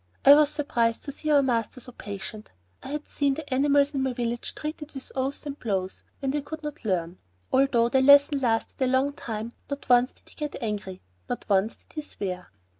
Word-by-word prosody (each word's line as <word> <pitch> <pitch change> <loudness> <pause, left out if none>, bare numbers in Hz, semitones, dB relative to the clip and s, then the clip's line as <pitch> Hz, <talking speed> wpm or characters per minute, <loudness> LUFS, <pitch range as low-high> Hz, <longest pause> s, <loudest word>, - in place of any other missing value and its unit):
I 280 - +11
was 295 0 +6
surprised 240 -7 0
to 285 - -4
see 305 +2 -5
our 290 -2 +5
master 240 -1 -1
so 250 +1 -10
patient. 205 -1 -7 0.3
I - - -9
had 295 +2 -4
seen 280 -2 0
the 315 -1 -7
animals 285 +2 +3
in 270 - 0
my 265 -1 0
village 240 -1 -3
treated 305 0 -6
with 270 -2 -8
oaths 270 +3 -2
and 285 0 -6
blows 190 -4 -2 0.2
when 270 -1 0
they 295 +1 -1
could 315 +2 -8
not 300 -3 -6
learn. 180 -4 -1 0.3
Although 260 -3 +4
the 265 +1 +3
lesson 285 +1 +7
lasted 235 +1 -1
a 260 - +3
long 260 +2 +2
time, 225 -3 -5 0.2
not 280 0 -5
once 245 +1 +5
did - - -28
he - - -14
get 300 -2 -4
angry, 205 -4 -4 0.3
not - - -3
once 200 +2 +2
did - - -26
he 305 - -3
swear. 185 -10 -5
265 Hz, 210 wpm, -26 LUFS, 225-285 Hz, 0.3 s, I